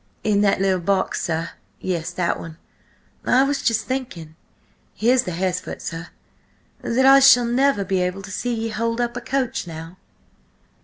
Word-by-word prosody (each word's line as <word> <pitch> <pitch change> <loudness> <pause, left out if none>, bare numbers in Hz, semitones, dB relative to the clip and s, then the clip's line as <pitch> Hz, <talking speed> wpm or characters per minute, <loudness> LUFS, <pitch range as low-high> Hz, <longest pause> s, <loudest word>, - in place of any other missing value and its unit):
"In 205 -1 +2
that 200 -2 +2
little 190 -1 +1
box, 190 +2 0
sir–yes–that 170 +1 -3
one. 160 -1 -9 0.7
I 260 +2 +4
was 280 +1 -1
just 230 -2 0
thinking–here's 240 +2 -3
the 180 - -3
haresfoot, 180 +1 -3
sir–that 180 +8 -5
I 270 0 +8
shall 265 -3 +7
never 245 -3 +2
be 190 -1 0
able 180 +2 -2
to 195 - -9
see 245 +6 -2
ye 225 -1 -2
hold 230 +2 -2
up 240 0 -1
a 245 - -4
coach 255 -6 -2
now!" 165 +2 -9
200 Hz, 145 wpm, -22 LUFS, 180-245 Hz, 0.7 s, I